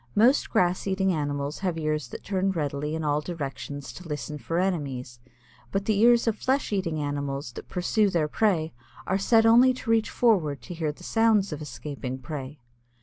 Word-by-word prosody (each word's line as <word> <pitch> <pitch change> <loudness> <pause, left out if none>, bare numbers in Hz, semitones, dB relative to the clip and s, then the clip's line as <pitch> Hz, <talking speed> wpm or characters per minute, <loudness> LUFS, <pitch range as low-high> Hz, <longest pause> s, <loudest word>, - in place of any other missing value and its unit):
Most 240 +7 +4
grass 180 +2 +1
eating 190 -1 +1
animals 145 -1 -2
have 180 -4 -1
ears 155 -4 -1
that - - -9
turn 195 -1 0
readily 150 -1 -2
in 160 - -3
all 150 0 +1
directions 145 -3 -6
to 180 - -10
listen 150 0 -5
for 165 +7 -3
enemies, 140 -10 -2 0.5
but 195 0 -1
the 215 -2 +1
ears 235 +1 +5
of 225 -2 +1
flesh 265 -4 0
eating 175 -5 -1
animals 140 -3 -3
that - - -10
pursue 200 +3 +1
their 165 -5 +1
prey 165 -3 +1 0.3
are 190 +1 0
set 225 +3 +4
only 245 +3 +6
to 240 -2 -3
reach 225 -1 +2
forward 175 - +2
to 175 - -7
hear 160 -3 -1
the 165 +5 -15
sounds 220 -4 +2
of 150 - -6
escaping 140 -3 -6
prey. 140 0 -7
165 Hz, 185 wpm, -26 LUFS, 145-200 Hz, 0.5 s, only